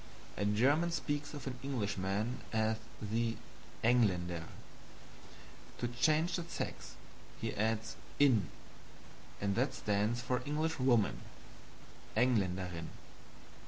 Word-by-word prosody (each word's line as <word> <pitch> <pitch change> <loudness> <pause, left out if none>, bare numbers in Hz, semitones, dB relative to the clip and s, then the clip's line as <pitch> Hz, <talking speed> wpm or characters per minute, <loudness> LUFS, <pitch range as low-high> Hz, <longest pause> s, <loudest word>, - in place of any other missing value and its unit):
A 100 - -1
German 135 +11 +3
speaks 145 -3 -2
of 145 - -7
an 125 -2 -4
Englishman 105 -3 -1
as 110 0 +2 0.2
the 115 +2 -1 0.5
ENGLÄNNDER; 90 -8 +3 1.3
to 120 - -1
change 155 +8 +2
the 170 - -3
sex, 170 - -5 0.4
he - - -2
adds 110 +1 0 0.2
INN, 120 - +5 0.9
and 100 0 +1
that 125 +7 +1
stands 105 +3 +1
for 125 +1 0
Englishwoman 135 -6 +2 1.0
ENGLÄNDERINN. 95 -8 +1
115 Hz, 95 wpm, -35 LUFS, 100-135 Hz, 1.3 s, INN